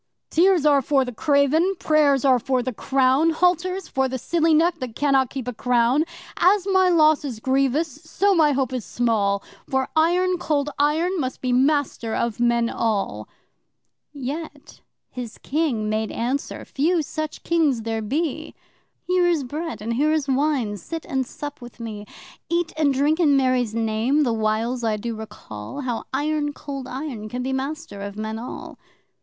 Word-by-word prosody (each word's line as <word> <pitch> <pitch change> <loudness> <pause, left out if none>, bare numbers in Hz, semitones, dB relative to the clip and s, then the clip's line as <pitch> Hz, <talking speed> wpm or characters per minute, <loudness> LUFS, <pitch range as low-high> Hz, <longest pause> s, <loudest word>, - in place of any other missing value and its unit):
'Tears 355 -2 +4
are 285 -2 +5
for 270 0 +2
the 250 - -6
craven, 300 - +2
prayers 290 -5 +3
are 260 -2 +5
for 255 +1 0
the 255 0 -3
clown 265 +6 +2
Halters 360 +2 +1
for 265 0 0
the 260 0 -3
silly 330 +5 +1
neck 330 +2 +3
that 250 -4 -6
cannot 270 -3 +2
keep 260 -3 -6
a 250 - -2
crown.' 245 +5 +2 0.3
'As 380 +2 +4
my 375 -2 +3
loss 310 -3 +4
is 250 -6 -5
grievous, 270 +4 0
so 400 0 +1
my 315 -4 +4
hope 265 -2 -1
is 250 -3 -2
small, 205 -5 0 0.3
For 265 -1 0
Iron 355 +3 +2
Cold 295 -3 0
Iron 325 +6 +1
must 260 -3 -3
be 255 -1 -1
master 265 -4 +1
of 235 -2 -1
men 235 -1 +2
all!' 200 - -2 0.8
Yet 290 +2 -7 0.3
his 245 -3 -7
King 275 -8 -1
made 215 0 -1
answer 255 +5 -3
(few 320 +4 +1
such 310 +1 -5
Kings 300 -9 +1
there 225 0 -2
be!) 310 +7 -2 0.5
'Here 360 -1 +2
is 335 -5 +1
Bread 305 -1 -5
and 230 +2 -2
here 295 +6 +2
is 305 -3 0
Wine 265 -6 0
sit 325 - -7
and 265 -2 -2
sup 290 -1 -7
with 240 0 -12
me. 210 -3 -7 0.4
Eat 340 -1 0
and 305 -3 +2
drink 290 +5 +1
in 290 -5 +4
Mary's 255 -4 +1
Name, 230 +6 +1
the 240 -4 +1
whiles 225 +3 -1
I 220 -2 +1
do 230 +2 -4
recall 215 - -8
How 245 -4 -3
Iron 295 +1 -1
Cold 275 -3 -7
Iron 255 -6 -5
can 250 +3 -4
be 265 +1 -2
master 270 -5 -4
of 200 0 -6
men 220 +1 -4
all! 240 - -8
270 Hz, 170 wpm, -23 LUFS, 235-310 Hz, 0.8 s, are